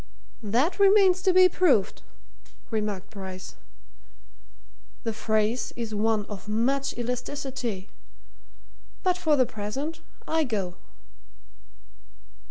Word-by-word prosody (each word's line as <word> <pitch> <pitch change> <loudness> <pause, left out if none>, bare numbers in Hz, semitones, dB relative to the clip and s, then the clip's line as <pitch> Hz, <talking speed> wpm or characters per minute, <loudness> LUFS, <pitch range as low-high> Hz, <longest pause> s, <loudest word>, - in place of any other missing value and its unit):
"That 245 - 0
remains 390 -2 +6
to 375 - +3
be 370 0 +7
proved," 325 - +2 0.7
remarked 210 -3 -3
Bryce. 190 -3 -8 1.5
"The 225 - -2
phrase 220 +2 0
is 230 -2 -4
one 215 0 +1
of 205 -1 -9
much 265 +6 0
elasticity. 245 -4 -3 1.2
But 365 -2 +3
for 315 -4 +3
the 255 -3 +4
present 235 +10 -5 0.3
I 320 0 +2
go!" 200 -9 -3
235 Hz, 95 wpm, -26 LUFS, 210-305 Hz, 1.5 s, be